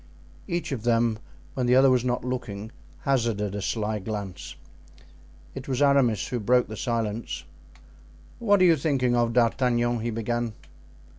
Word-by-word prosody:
Each 175 -4 -2
of 130 -5 -3
them, 115 -1 +1 0.3
when 125 -2 -1
the 125 - +5
other 135 0 +6
was 125 -2 +3
not 125 0 -1
looking, 110 -4 -4 0.3
hazarded 115 -7 0
a 105 - -3
sly 105 +1 -1
glance. 100 -2 -6 1.0
It 135 -1 -8
was 130 -2 -1
Aramis 140 -6 +3
who 125 - -2
broke 125 +3 +3
the 110 - -7
silence. 115 -1 -3 1.0
"What 205 -5 +4
are - - +7
you 165 -2 +5
thinking 135 -4 +1
of, 120 -1 +1
D'Artagnan?" 120 0 +2
he 115 +2 -2
began. 115 0 -2
120 Hz, 150 wpm, -26 LUFS, 110-130 Hz, 1.0 s, are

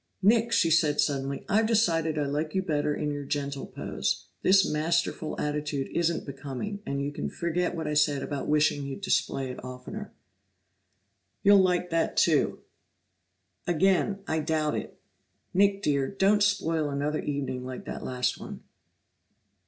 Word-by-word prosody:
"Nick," 225 +3 +4
she 165 -6 +3
said 155 -2 +3
suddenly, 140 -1 0
"I've 220 +2 +3
decided 165 -8 +2
I 145 - +1
like 150 +4 -2
you 190 - +1
better 150 -4 0
in 150 -1 -2
your 145 0 -4
gentle 140 -1 -3
pose; - - -3 0.2
this 190 +1 +5
masterful 160 0 -1
attitude 150 -2 -2
isn't 170 -1 +1
becoming, 140 +9 -5
and 140 0 -1
you 145 - -2
can 145 +1 -4
forget 175 +1 -1
what 160 - -4
I 150 - -1
said 150 -2 +2
about 140 -2 -4
wishing 150 -1 +2
you'd 140 +7 -6
display 135 -8 0
it 125 - -9
oftener." 130 +12 -7 1.3
"You'll 200 -1 +7
like 180 -1 +1
that, 165 0 0
too." - - +3 1.1
"Again 190 +3 +2
I 160 - 0
doubt 155 -1 0
it. - - -5 0.5
Nick, 200 +1 +3
dear, 140 -5 +1
don't 200 +3 +2
spoil 165 -7 +1
another 145 +2 -1
evening 135 -3 -3
like 130 0 -7
that - - -6
last 125 -1 -1
one!" - - -9
155 Hz, 150 wpm, -28 LUFS, 140-185 Hz, 1.3 s, You'll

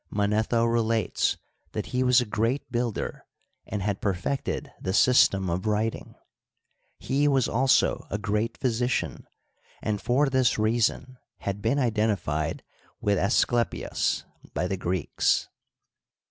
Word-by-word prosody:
Manetho 110 +3 +1
relates 115 -2 +1 0.4
that - - -3
he 125 - +1
was 125 0 +5
a 125 - 0
g^at 115 +5 0
builder, 120 -2 -2 0.4
and 105 -2 -3
had 100 -1 -2
perfected 100 +8 -2
the 95 - -2
system 100 -5 +4
of 90 +5 -2
writing. 110 +1 -1 0.8
He 145 +2 +1
was 135 -4 +3
also 130 +3 +2
a 105 - -2
great 105 +3 -1
physician, 125 0 -1 0.5
and 105 -2 -2
for 135 +4 +2
this 130 -3 +2
reason 115 +3 0 0.2
had 100 0 -3
been 115 +6 +1
iden 110 -5 +1
tified 75 -4 -3 0.4
with 100 -2 +1
Asclepios 120 +3 +1 0.3
by 90 - 0
the 95 - -1
Greeks. 90 -2 0
110 Hz, 125 wpm, -26 LUFS, 100-125 Hz, 0.8 s, was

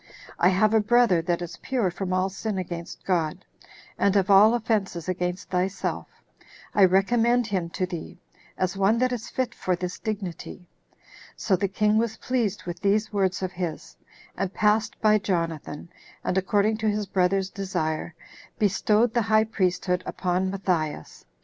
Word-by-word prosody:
I 180 - +5
have 205 +3 +3
a 220 - +5
brother 215 -5 +3
that 175 0 -1
is 170 -1 -8
pure 240 -9 0
from 185 +1 -4
all 185 +1 +1
sin 200 +1 -4
against 170 -2 -6
God, 175 -1 -1 0.5
and 200 0 +3
of 200 0 +3
all 210 +4 +7
offenses 205 -7 -1
against 180 +1 -3
thyself; 185 +2 -1 0.7
I 200 - +6
recommend 230 +6 +3
him 190 -6 -2
to 185 - -2
thee, 175 -3 -7 0.4
as 185 0 -1
one 195 +3 +3
that 255 +1 +1
is 240 -2 -4
fit 255 -2 -2
for 185 - -1
this 180 0 -5
dignity." 190 -4 -6 0.7
So 195 - +1
the 195 +2 0
king 210 +2 +2
was 225 -1 -1
pleased 230 -6 -1
with 175 0 -6
these 210 +2 +1
words 190 -2 0
of 185 - -2
his, 165 - -5 0.4
and 195 -2 -2
passed 210 +2 +1
by 215 -1 +4
Jonathan, 165 -6 -3 0.4
and, - - -1
according 205 +3 +2
to 220 -1 0
his 210 0 -1
brother's 190 0 +1
desire, 170 -4 -3 0.4
bestowed 215 +3 +2
the 240 - +2
high 215 0 +3
priesthood 180 -4 0
upon 185 +1 -1
Matthias. 175 - -3
195 Hz, 160 wpm, -25 LUFS, 180-215 Hz, 0.7 s, all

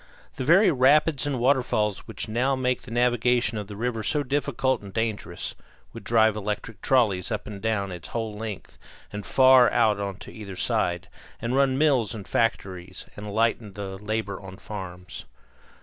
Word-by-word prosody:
The - - -2
very 175 +8 +5
rapids 145 0 +3
and 140 -2 -1
waterfalls 120 -6 +1
which - - -4
now 125 +5 +1
make 125 -1 0
the - - -12
navigation 120 -1 +2
of 105 - -6
the 105 - -8
river 115 +1 -2
so 145 +7 +1
difficult 135 -2 0
and 100 -1 -10
dangerous 105 -5 -3 0.4
would - - -9
drive 110 -2 +3
electric 105 +1 -4
trolleys 105 -9 +2
up 105 - -3
and 105 -2 -8
down 105 -4 -1
its 90 -2 -8
whole 110 -2 -4
length 105 -2 -7 0.3
and 105 0 -5
far 130 +5 +6
out 105 -2 +3
on 100 -1 -4
either 100 -4 -8
side, 90 0 0 0.3
and 120 +2 -2
run 135 -1 +3
mills 135 -8 +2
and 100 -3 -8
factories, 95 -6 -2
and 105 0 -7
lighten 110 -1 0
the 95 -1 -6
labor 105 -1 -3
on 95 -1 -10
farms. 90 -4 -8
110 Hz, 165 wpm, -25 LUFS, 100-125 Hz, 0.4 s, far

